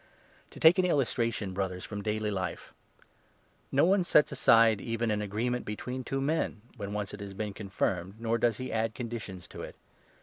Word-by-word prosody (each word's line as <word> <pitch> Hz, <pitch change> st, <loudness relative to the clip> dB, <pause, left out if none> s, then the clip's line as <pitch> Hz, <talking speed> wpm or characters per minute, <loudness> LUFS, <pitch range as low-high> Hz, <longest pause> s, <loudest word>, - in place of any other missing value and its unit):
To -, -, -12 dB
take 165 Hz, +4 st, +7 dB
an 185 Hz, -, +4 dB
illustration, 115 Hz, -, 0 dB
Brothers, 95 Hz, -1 st, -3 dB
from 100 Hz, -1 st, -5 dB
daily 105 Hz, 0 st, -1 dB
life: 95 Hz, -2 st, -4 dB, 0.5 s
— -, -, -37 dB
No 140 Hz, +4 st, +4 dB
one 195 Hz, +3 st, +4 dB
15 -, -, +1 dB
sets 150 Hz, -, +5 dB
aside 115 Hz, -5 st, +5 dB
even 115 Hz, -1 st, -1 dB
an 105 Hz, 0 st, 0 dB
agreement 115 Hz, +5 st, -1 dB
between 125 Hz, +5 st, -5 dB
two 135 Hz, +2 st, -2 dB
men, 140 Hz, -7 st, -1 dB
when 100 Hz, -4 st, -5 dB
once 105 Hz, -2 st, -3 dB
it 105 Hz, -, -7 dB
has 100 Hz, -1 st, -7 dB
been 105 Hz, 0 st, -3 dB
confirmed, 95 Hz, -2 st, -2 dB
nor 115 Hz, 0 st, 0 dB
does 115 Hz, -2 st, +2 dB
he 130 Hz, -, -5 dB
add 110 Hz, 0 st, 0 dB
conditions 110 Hz, -7 st, -6 dB
to -, -, -8 dB
it. -, -, -8 dB
110 Hz, 195 wpm, -30 LUFS, 100-125 Hz, 0.5 s, take